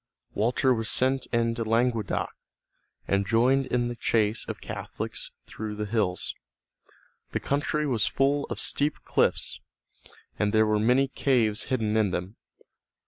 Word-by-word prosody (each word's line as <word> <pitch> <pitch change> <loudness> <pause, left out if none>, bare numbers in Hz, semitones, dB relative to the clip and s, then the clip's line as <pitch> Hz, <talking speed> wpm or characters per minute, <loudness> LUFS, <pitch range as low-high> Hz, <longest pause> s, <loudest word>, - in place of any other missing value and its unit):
Walter 125 +4 +2
was 115 -2 -2
sent 130 0 +3
into 115 0 0
Languedoc, 115 -2 0 0.8
and 100 0 +2
joined 130 +5 +3
in 120 -1 0
the 120 - -4
chase 110 -2 +1
of - - -5
Catholics - - -6 0.2
through 105 -1 -6
the 105 0 -3
hills. 100 -4 -1 1.0
The - - 0
country 145 +2 -1
was 125 -6 +1
full 140 +1 +1
of - - -5
steep 145 +1 +1
cliffs, - - +1 0.8
and 105 0 +1
there 110 0 +5
were 105 0 +2
many 125 +5 +3
caves 125 -5 +1
hidden 110 -4 -1
in 110 -2 +3
them. 90 +3 -4
115 Hz, 140 wpm, -27 LUFS, 105-130 Hz, 1.0 s, there